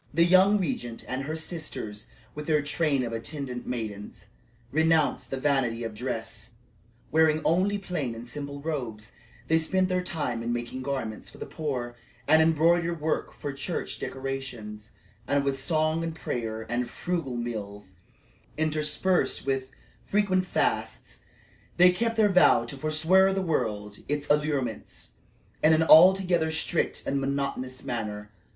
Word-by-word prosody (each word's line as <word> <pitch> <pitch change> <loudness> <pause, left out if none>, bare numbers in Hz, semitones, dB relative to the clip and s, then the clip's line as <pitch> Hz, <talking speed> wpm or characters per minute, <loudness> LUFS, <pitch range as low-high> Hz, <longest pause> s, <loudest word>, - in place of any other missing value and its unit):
The 165 +2 +4
young 185 +4 +6
regent 120 -9 -3
and 130 +1 -3
her 155 +2 -3
sisters, 135 -10 -5 0.3
with 150 0 -7
their 150 -2 +2
train 145 -2 +1
of 115 -1 -4
attendant 125 +1 -5
maidens, 105 -5 -5 0.5
renounced 160 0 +2
the 135 - -3
vanity 130 -5 +1
of 115 -1 -4
dress 110 -1 -5 0.6
wearing 155 0 +4
only 190 +5 +2
plain 155 -11 -3
and 115 +2 -9
simple 140 +2 -6
robes; 120 -8 -4 0.4
they 160 0 +4
spent 185 +3 +1
their 185 0 +1
time 145 -10 -2
in 115 +1 -2
making 120 +2 -3
garments 130 -5 -4
for - - -14
the - - -6
poor, 130 -6 -4 0.3
and 160 +1 +6
embroidered 165 +1 +3
work 155 +1 -1
for 145 -1 -6
church 140 +5 -4
decorations; 125 -6 -6 0.4
and 140 0 +2
with 135 -1 -1
song 155 +2 +1
and 165 -1 -4
prayer 110 -7 -4
and 120 +1 -2
frugal 165 -9 -3
meals, 105 -5 -5 0.6
interspersed 155 +4 +1
with 135 -1 -1 0.3
frequent 185 -3 +1
fasts, - - -1 0.6
they 180 +1 +8
kept 230 +5 -1
their 215 -2 +4
vow 180 -10 +5
to 120 - -5
"forswear 160 +7 +3
the 195 0 -1
world 105 - -2
and - - -18
its 145 0 -2
allurements," 145 -7 -2 0.5
in 155 +1 +6
an 160 +1 +4
altogether 175 0 +6
strict 160 +1 0
and 140 0 0
monotonous 135 -2 -2
manner. 105 -3 -4
145 Hz, 145 wpm, -27 LUFS, 120-160 Hz, 0.6 s, they